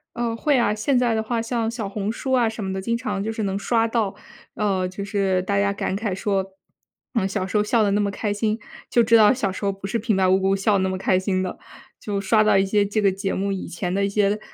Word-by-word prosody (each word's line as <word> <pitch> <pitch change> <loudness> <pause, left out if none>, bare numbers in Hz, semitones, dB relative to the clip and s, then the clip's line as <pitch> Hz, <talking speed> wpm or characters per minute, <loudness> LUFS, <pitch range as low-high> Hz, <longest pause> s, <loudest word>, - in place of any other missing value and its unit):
呃， 235 -1 -1
会 285 +4 +2
啊。 225 -4 +2
现 215 +6 +1
在 245 -2 +2
的 220 - 0
话 230 +1 -2
像 230 -1 -1
小 230 -3 -4
红 200 +1 -3
书 265 +3 -4
啊 240 -3 +3
什 220 -1 -6
么 190 0 -3
的， 190 - -3
经 230 +4 -1
常 235 -5 -3
就 220 - -2
是 220 -1 -3
能 195 -1 -1
刷 225 +2 +1
到， 225 -4 -1 0.4
呃， 195 -4 0
就 190 +2 -6
是 195 -2 0
大 200 +1 0
家 200 0 +2
感 200 -1 -2
慨 205 -1 -2
说： 195 -1 0 0.7
“嗯， 225 -6 +1
小 195 -1 -2
时 190 - -7
候 210 - +3
笑 220 +1 +2
得 205 - +2
那 205 +1 +2
么 200 - 0
开 205 +1 -2
心， 215 +1 0 0.3
就 240 - +4
知 230 +1 +4
道 220 +1 +7
小 220 -7 -1
时 185 - -8
候 200 - +2
不 195 0 -9
是 215 +4 -1
平 220 -1 0
白 190 -1 +3
无 190 +1 +4
故 195 0 +2
笑 195 +2 +1
得 200 - +3
那 190 0 0
么 185 - -2
开 185 0 +2
心 185 -1 -1
的。” 185 - -5 0.4
就 205 -2 -3
刷 215 +2 +3
到 210 -2 +4
一 195 - +3
些 205 +1 +2
这 210 +2 -1
个 200 -1 +4
节 195 +1 -3
目 200 +1 -1
以 195 - -4
前 180 +1 -4
的 200 +1 +1
一 - - +1
些 205 +1 +1
205 Hz, 300 characters per minute, -23 LUFS, 195-225 Hz, 0.7 s, 道